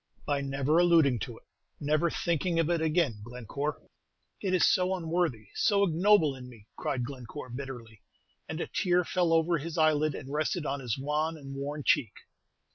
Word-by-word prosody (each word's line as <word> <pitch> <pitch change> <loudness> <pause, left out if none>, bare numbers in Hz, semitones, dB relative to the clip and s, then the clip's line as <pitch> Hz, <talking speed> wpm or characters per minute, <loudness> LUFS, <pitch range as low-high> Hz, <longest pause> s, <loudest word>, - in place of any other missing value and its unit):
"By 145 -1 0
never 140 +3 +1
alluding 165 -8 +4
to - - -6
it, - - -19 0.4
never 155 +3 +1
thinking 170 +1 -1
of 165 0 +2
it 170 -2 +1
again, 155 - +1
Glenoore." 125 +5 -5 0.6
"It 190 - -1
is 180 - +4
so 185 +1 +3
unworthy, 165 - -1
so 200 -2 +3
ignoble 175 -3 +4
in 125 -1 -10
me!" 115 -4 -15
cried 125 -3 -2
Glenoore, 130 0 -8
bitterly; 120 -4 -8 0.5
and 160 - -4
a - - -1
tear 180 0 +1
fell 175 -1 0
over 165 0 +3
his 165 +3 -6
eyelid 155 -2 +3
and 135 +2 -7
rested 155 +2 -1
on 140 0 -2
his 125 -3 -2
wan 150 +4 -1
and 135 -2 -9
worn 145 +2 -4
cheek. 110 - +2
150 Hz, 175 wpm, -29 LUFS, 135-170 Hz, 0.6 s, alluding